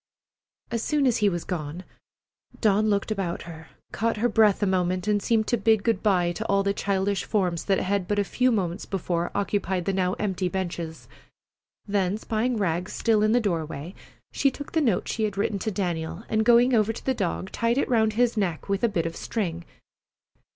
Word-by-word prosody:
As 230 -1 -1
soon 295 +2 +1
as 245 -2 +3
he 210 -1 +3
was 175 -3 -3
gone, 165 0 -5 0.8
Dawn 215 0 +3
looked 200 +1 0
about 190 -5 -2
her, 160 -1 -10 0.2
caught 225 +1 -1
her 235 +3 +2
breath 215 -3 +3
a - - +4
moment, 185 0 0
and 205 -1 +2
seemed 220 +1 +2
to 240 - +2
bid 220 -2 +3
good 225 -5 +1
by 180 -5 +2
to 220 +6 -5
all 200 0 +2
the 200 0 +1
childish 200 0 0
forms 180 -6 -1
that 195 -1 +2
had 195 -1 -1
but 205 - 0
a 205 - +3
few 250 +5 +1
minutes 190 -4 -2
before 175 -3 -2
occupied 195 -3 -1
the 195 - 0
now 185 -1 +1
empty 190 -3 -1
benches. 170 -3 -4 0.8
Then, 200 -1 0
spying 225 +2 -1
Rags 180 -2 -1
still 225 -2 +2
sitting 210 - +3
in - - +2
the 245 - +4
doorway, 165 -4 -3 0.4
she 275 - +2
took 285 +2 -9
the 320 - +1
note 225 -11 +1
she 220 - -1
had 205 -2 -4
written 200 0 0
to 220 - -2
Daniel 175 -2 -3
and, 220 0 +2
going 240 +2 +5
over 220 -1 +3
to 225 - -9
the 265 - +2
dog, 190 -3 -3
tied 230 +2 0
it - - +1
around 220 -3 +2
his 240 +1 +2
neck 185 -7 -2
with 200 +1 -1
a 235 - +4
bit 170 -5 -1
of 165 - -3
string. 170 -6 -3
200 Hz, 205 wpm, -25 LUFS, 180-220 Hz, 0.8 s, going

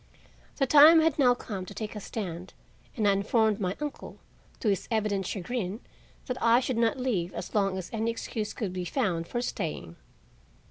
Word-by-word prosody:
The 275 - +1
time 305 +4 +8
had 315 -2 +1
now 250 -3 +5
come 205 -6 -6
to 185 - -10
take 215 0 -5
a - - -4
stand 185 -4 -6 0.4
and 215 -3 +2
I - - +6
informed 215 +2 +2
my 185 -1 -2
uncle, 295 -1 -6 0.4
to 220 - 0
his 195 -3 -1
evident 210 -4 0
chagrin, 205 0 -3 0.5
that 250 -1 -4
I 235 +1 +5
should 255 -2 -2
not 230 +2 +2
leave 210 -9 -1
as - - -6
long 195 -2 +1
as 185 - -6
any 225 0 0
excuse 225 -2 -4
could 200 -6 -4
be 180 -1 -3
found 175 -5 -1
for 240 0 -2
staying. 150 - -4
215 Hz, 185 wpm, -28 LUFS, 190-245 Hz, 0.5 s, time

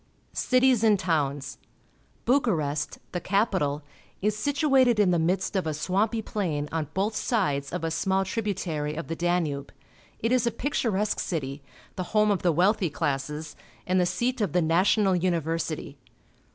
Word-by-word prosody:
Cities 255 -3 +3
and 215 -2 +5
Towns. 145 -6 -1 0.3
— - - -36
Bucharest, 165 - +1
the 180 - -2
capital 185 -8 0 0.4
is 210 +1 0
situated 270 -3 +3
in 195 -3 +4
tlie 170 -2 +2
midst 185 +5 0
of 185 -4 0
a 155 - -1
swampy 205 +8 0
plain 160 -10 -2
on 160 -2 -2
both 205 +3 0
sides 145 - 0
of - - -4
a 165 - -1
small 190 +4 +1
tributary 180 -8 -2
of 165 +1 -6
the 165 - -2
Danube. 165 -5 -1 0.5
It 230 - -1
is 250 -2 +3
a - - +2
picturesque 215 -7 -1
city, 140 -4 -3 0.4
the 185 - -1
home 210 0 +5
of 195 - 0
the 175 - +3
wealthy 185 +3 +2
classes, 145 +2 -3 0.3
and 185 +1 +2
the 180 - +3
.seat 240 +7 -1
of 205 - 0
the 180 - +3
national 190 +4 +3
university. 165 -4 -2
180 Hz, 160 wpm, -26 LUFS, 155-210 Hz, 0.5 s, and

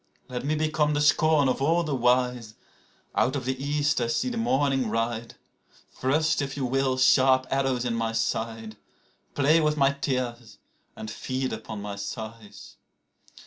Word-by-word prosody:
Let 125 -1 -4
me 150 +2 0
become 155 -1 +1
the - - +1
scorn 150 -1 +4
of 130 - -1
all 165 +5 +2
the 155 -3 -3
wise. 125 -3 +1 0.6
(Out 130 - +1
of 130 -3 -3
the 130 +1 -3
East 145 -1 0
I 120 - 0
see 115 - 0
the 245 - -4
morning 140 - +1
ride.) 115 +1 -2 0.6
Thrust, 150 +4 +1
if 135 0 -4
you 135 - -1
will, 130 +1 0
sharp 130 +1 +4
arrows 135 -2 0
in 120 - -1
my 115 -1 -1
side, 115 -1 -3 0.6
Play 150 +3 +4
with 150 0 +1
my 140 -1 +3
tears 125 -4 -3 0.4
and 110 - -7
feed 130 +3 -3
upon 105 -2 -7
my 100 -1 -6
sighs. 110 0 -8
130 Hz, 160 wpm, -26 LUFS, 115-145 Hz, 0.6 s, scorn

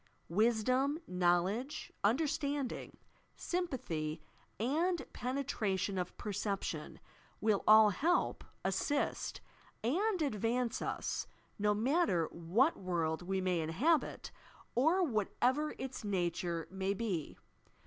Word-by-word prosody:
Wisdom, 240 - +2
knowledge, 180 +9 0
understanding, 285 +3 0 0.4
sympathy 170 - -2 0.4
and 325 - +1
penetration 215 -8 -1
of 180 0 -4
perception 195 -6 -3 0.4
will 215 -2 +2
all 215 -1 +8
help, 335 - +1 0.2
assist 195 +10 -1 0.4
and 370 - +1
advance 230 -1 0
ua, - - -3 0.6
no 210 0 +3
matter 230 - +2
what 200 - +2
world 170 -3 -1
we 190 +1 -1
may 180 -2 +1
inhabit 270 - +1 0.4
or 320 +9 +4
whatever 260 - +1
its 265 -2 -5
nature 175 -4 -1
may 190 +1 -1
be. 190 -8 -3
215 Hz, 95 wpm, -34 LUFS, 185-280 Hz, 0.6 s, all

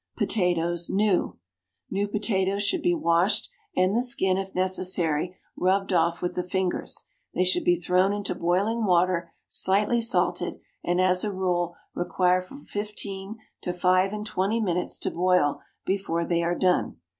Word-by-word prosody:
POTATOES, 175 -3 0
NEW. 200 -2 +1 0.5
New 200 +1 0
potatoes 200 -1 0
should 335 - +1
be 350 +1 +2
washed 190 - +2 0.3
and 185 +3 +3
the 240 - +3
skin, 240 -7 +2
if 190 0 -4
necessary, 185 -2 0 0.2
rubbed 195 +1 +1
off 170 0 +1
with 175 - -1
the 180 - -1
fingers; 180 0 -2 0.3
they 180 - +3
should 185 0 +2
be 175 - +4
thrown 180 +3 +2
into 205 0 -2
boiling 200 +7 0
water, 180 -2 +2 0.2
slightly 210 +5 +2
salted, 230 +2 0 0.2
and 175 +1 0
as 185 0 +3
a 210 - -1
rule 175 -2 -1 0.2
require 180 +1 +1
from 270 +11 -12
fifteen 205 0 -5 0.2
to 180 - -2
five 185 +2 +2
and 210 0 -5
twenty 210 +2 0
minutes 180 -5 -1
to - - -2
boil 180 -4 +2 0.2
before 185 -3 -1
they 170 0 0
are 170 +1 0
done. 185 -1 +1
185 Hz, 155 wpm, -26 LUFS, 175-200 Hz, 0.5 s, be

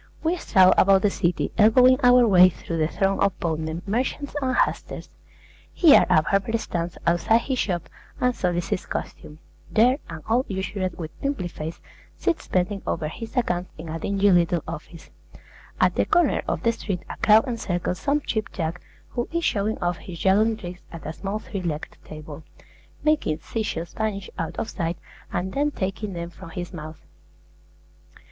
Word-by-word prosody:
We 330 +2 +2
stroll 185 - +5
about 195 0 +5
the 205 - +3
city 175 -1 0
elbowing 250 +4 +6
our 245 -1 +6
way 185 -3 +7
through 165 -1 -6
the 155 - +2
throng 195 +3 0
of 200 -1 +1
boatmen, 160 0 -2
merchants, 255 +7 -2
and 260 -1 0
hucksters. - - -1 0.6
Here 325 -5 +6
a 155 - +5
barber 200 +6 +1
stands 170 -5 -4
outside 175 +7 +3
his 260 0 -2
shop 175 -4 -1 0.3
and 250 -1 +1
solicits 180 +2 -1
custom; 150 - -6 0.3
there 250 +5 +4
an 160 -1 -8
old 240 +4 +2
usurer 190 0 -2
with 160 -2 -6
pimply 275 -10 -1
face 160 0 -6 0.4
sits 350 -3 -1
bending 185 +2 0
over 155 -2 -1
his 225 - -8
accounts 180 -7 0
in 160 +1 -8
a 165 +1 -4
dingy 200 +3 +2
little 175 -2 +3
office; 165 +1 -9 0.7
at - - +4
the - - +1
corner 350 - +3
of - - -2
the 230 - +4
street 195 -5 -4
a - - -6
crowd 220 +4 +5
encircles 180 -7 -2
some 290 +1 +1
Cheap 220 -6 -3
Jack 170 +1 -3 0.3
who 240 - -3
is 335 0 -1
showing 210 +1 0
off 175 0 0
his 175 -3 -9
juggling 215 +5 +3
tricks 180 -3 -8
at 165 - -9
a 155 - -4
small 195 +4 -4
three 205 -2 -6
legged 155 -4 -4
table, 155 0 -10 0.6
making 305 - +2
sea 225 - -3
shells 170 -5 -4
vanish 205 -3 -3
out 165 -1 -4
of - - -2
sight 170 -5 -3 0.3
and 185 +2 -2
then 290 +2 +1
taking 200 -4 -4
them 170 0 -5
from 165 - -11
his 175 +3 -6
mouth. 155 -1 -9
190 Hz, 175 wpm, -24 LUFS, 170-225 Hz, 0.7 s, way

